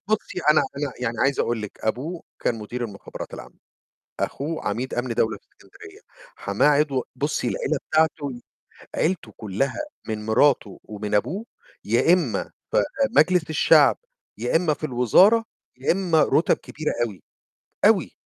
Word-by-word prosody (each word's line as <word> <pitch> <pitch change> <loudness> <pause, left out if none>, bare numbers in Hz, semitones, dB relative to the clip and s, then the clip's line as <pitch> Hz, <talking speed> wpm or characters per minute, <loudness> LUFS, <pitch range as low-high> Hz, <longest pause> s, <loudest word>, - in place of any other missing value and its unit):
بُصي 215 -4 -1
أنا 150 - +5 0.2
أنا 140 -2 -2
يعني 115 -2 -2
عايز 140 0 +2
أقول 115 -2 -1
لِك، 105 - -8
أبوه 140 +10 -3 0.2
كان 120 - +1
مدير 120 +3 -5
المُخابرات 100 -3 -8
العامة، - - -11 0.6
أخوه 155 +3 -3
عميد 120 +6 -3
أمن 120 0 -2
دولة 110 -1 0
في - - -30
الإسكندرية، 405 0 -16 0.4
حماه - - +1
عضو 145 -3 +2
بُصي 145 +2 -1
العيلة 155 - -1
بتاعتُه، 150 -5 +1 0.5
عيلته 180 +2 -1
كُلّها 110 - -2 0.3
من 110 -1 -4
مراته 110 -3 +2
ومن 105 0 -4
أبوه، 195 - -1 0.4
يا 120 +10 +4
إما 165 -10 +1 0.3
في - - +2 0.4
مجلس 170 +2 +4
الشعب، 155 - +5 0.4
يا - - -2
إما 165 -2 +3
في - - -13
الوزارة، 180 - +4 0.3
يا 130 - +1
إما 175 -4 +3
رُتَب 160 - +3
كبيرة 155 +1 -4
أوي، 100 -6 -9 0.6
أوي. - - +4
140 Hz, 145 wpm, -24 LUFS, 115-160 Hz, 0.6 s, أنا